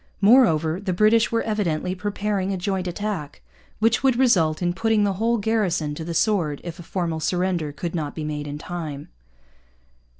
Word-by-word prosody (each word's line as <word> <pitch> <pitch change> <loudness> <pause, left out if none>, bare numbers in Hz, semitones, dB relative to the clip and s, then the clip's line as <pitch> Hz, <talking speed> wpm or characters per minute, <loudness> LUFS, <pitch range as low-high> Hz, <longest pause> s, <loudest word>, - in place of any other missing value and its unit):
Moreover, 190 - +4
the 195 -2 -2
British 215 +4 +3
were 230 0 +1
evidently 185 -5 -1
preparing 200 0 -2
a 190 - -1
joint 185 0 -2
attack, 180 -5 -4 0.3
which 225 +2 +2
would 265 -2 +3
result 180 -12 +3
in 175 -1 0
putting 220 +2 +1
the 200 -1 +1
whole 235 +1 +2
garrison 200 -8 0
to 160 - -6
the 170 +1 -5
sword 170 -8 +1
if 170 -1 -7
a - - -6
formal 170 -2 -3
surrender 175 -2 -1
should 175 - -3
not 155 -4 -3
be 155 - -4
made 150 -1 -4
in 145 0 -5
time. 155 -3 -6
180 Hz, 175 wpm, -23 LUFS, 160-210 Hz, 0.3 s, Moreover